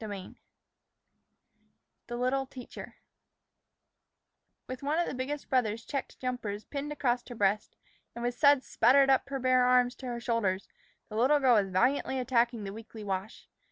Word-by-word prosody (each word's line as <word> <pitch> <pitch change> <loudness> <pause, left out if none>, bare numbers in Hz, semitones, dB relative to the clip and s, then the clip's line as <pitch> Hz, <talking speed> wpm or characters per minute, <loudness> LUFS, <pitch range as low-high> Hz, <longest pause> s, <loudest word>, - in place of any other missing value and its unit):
XVIII 200 -3 -7 1.7
THE 240 - -5
LITTLE 260 +2 0
TEACHER 255 -1 -10 1.7
WITH 255 0 -7
one 290 +3 0
of 345 - +2
the - - -4
biggest 275 +3 -4
brother's 230 -3 0
checked 275 -2 -4
jumpers 235 -5 -4
pinned 290 +1 -5
across 245 -4 0
her 245 - -7
breast, 205 0 0 0.4
and 235 - -6
with 245 0 0
suds 285 +1 +4
spattered 270 +3 +4
up 270 +1 +2
her 275 - -2
bare 255 -1 +3
arms 250 0 +4
to 260 - -8
her 240 -1 -3
shoulders, 230 -6 -1 0.4
the 215 - -7
little 265 +6 +4
girl 260 -3 +4
was 205 -4 +3
valiantly 255 +7 +1
attacking 240 -3 +1
the 195 0 -5
weekly 220 0 -10
wash. 195 +2 -5
245 Hz, 155 wpm, -30 LUFS, 220-265 Hz, 1.7 s, suds